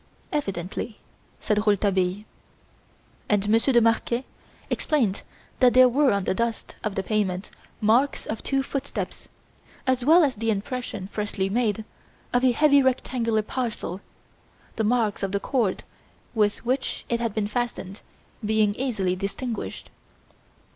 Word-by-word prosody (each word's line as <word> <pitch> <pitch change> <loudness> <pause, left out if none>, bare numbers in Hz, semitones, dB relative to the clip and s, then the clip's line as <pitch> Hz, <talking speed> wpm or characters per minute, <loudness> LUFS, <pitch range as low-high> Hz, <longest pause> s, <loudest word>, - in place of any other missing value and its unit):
"Evidently," 200 - -3 0.4
said 210 -1 +1
Rouletabille. 195 -1 +2 1.1
And 205 -1 +2
Monsieur 225 +5 +4
de 240 -2 +5
Marquet 235 +2 +1 0.5
explained 235 -11 +1 0.4
that 250 -1 +5
there 255 0 +9
were 275 +2 +3
on 200 -1 +1
the - - 0
dust 230 +2 -2
of 210 -2 -2
the 195 - -1
pavement 195 -2 -1 0.3
marks 235 +7 +3
of 220 - -4
two 270 -1 0
footsteps, 275 +1 -5 0.6
as 260 -1 +1
well 325 +6 +6
as 270 -6 +1
the 225 +1 -1
impression, 215 -1 -3
freshly 205 -2 -2
made, 220 -1 0 0.5
of 245 +1 +3
a 255 - +5
heavy 285 +2 +5
rectangular 245 -4 +1
parcel, 215 -6 -3 0.7
the 220 - 0
marks 220 -2 +1
of 195 -1 -2
the 200 - +1
cord 225 -5 0 0.5
with 210 -1 +1
which 260 +2 -1
it 235 - 0
had 230 -3 -2
been 210 -2 0
fastened 210 -3 -3 0.4
being 215 -1 +2
easily 210 -7 -1
distinguished. 215 +5 -5
225 Hz, 135 wpm, -25 LUFS, 205-250 Hz, 1.1 s, there